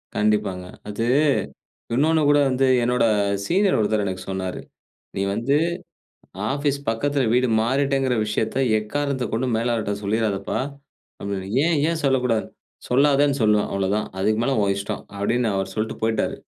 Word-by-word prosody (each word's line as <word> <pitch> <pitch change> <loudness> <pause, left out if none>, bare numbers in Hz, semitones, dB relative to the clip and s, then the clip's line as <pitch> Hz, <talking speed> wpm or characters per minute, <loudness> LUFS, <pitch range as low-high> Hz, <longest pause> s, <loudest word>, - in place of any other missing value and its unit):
கண்டிப்பாங்க. 105 -4 0 0.2
அது 105 +3 -2 0.9
இன்னொன்னு 160 +5 +3
கூட 145 0 +5
வந்து 130 +1 +2 0.2
என்னோட 125 +1 +2 0.4
சீனியர் 195 +1 +2
ஒருத்தர் 105 -1 +1
எனக்கு 95 -2 -4
சொன்னாரு. 95 -1 -3 0.6
"நீ 95 - -1
வந்து 115 +6 0 1.0
ஆபீஸ் 140 0 0
பக்கத்தில 135 +4 0
வீடு 125 +1 +3
மாறிட்டேங்கிற 135 +1 +1
விஷயத்த 110 +1 -2 0.2
எக்காரணத்தக் 130 +2 -2
கொண்டும் 120 +1 0
மேலாளர்ட்ட 115 -3 -1
சொல்லிறாதப்பா!" 100 -1 -1 0.6
அப்பிடின்னு 100 -1 -4 0.2
"ஏன் 170 -1 +2
ஏன் 165 -1 -1
சொல்லக்கூடாது?," 125 -5 +1 0.4
"சொல்லாதேன்னு 140 +2 +3
சொல்லுவேன் 105 -1 +3
அவ்ளவதான். 100 +2 0
அதுக்கு 110 +3 +1
மேல 135 +2 +1
உன் 100 -1 +1
இஷ்டம்". 100 - -4
அப்பிடின்னு 115 +3 0
அவரு 95 0 -3
சொல்ட்டு 110 +1 -2
போய்ட்டாரு. 110 0 0
115 Hz, 130 wpm, -23 LUFS, 105-135 Hz, 1.0 s, கூட